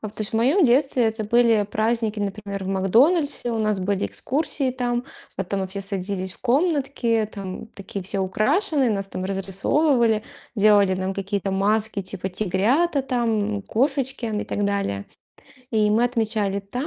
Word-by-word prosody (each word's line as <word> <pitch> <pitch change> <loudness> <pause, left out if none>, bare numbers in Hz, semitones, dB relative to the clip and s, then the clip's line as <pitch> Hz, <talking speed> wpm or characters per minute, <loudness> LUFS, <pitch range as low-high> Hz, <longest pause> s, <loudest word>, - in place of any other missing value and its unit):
А, 215 - -5
то 210 - -14
есть, 210 - -1
в - - 0
моем 280 - +4
детстве 255 -1 +3
это 220 0 -1
были 230 -1 +4
праздники, 220 0 0
например, 200 -1 -4
в - - -4
"Макдональдсе". 240 - +2
У 225 - -1
нас 215 -2 +1
были 195 +1 -1
экскурсии, 280 -1 -1
там 245 -1 -2 0.3
потом 195 +1 -2
мы 190 - -1
все 200 +1 -5
садились 190 -1 -3
в - - -19
комнатки, 260 - +1
там, 195 +1 -6
такие 200 -2 -7
все 195 +1 -2
украшенные, 265 - +1
нас 195 -2 -2
там 185 - -5
разрисовывали, 220 - +1 0.3
делали 205 -2 +5
нам 185 +1 -2
какие-то 195 0 -2
маски, 210 +2 0
типа, 190 0 -5
тигрята, 220 - +1
там, 225 -5 0
кошечки 265 +2 -1
и 215 -2 -2
так 205 - -2
далее. 200 - -1 0.7
И 215 -2 +2
мы 230 +3 +3
отмечали 220 -4 0
там. 245 +8 -5
215 Hz, 160 wpm, -23 LUFS, 195-245 Hz, 0.7 s, делали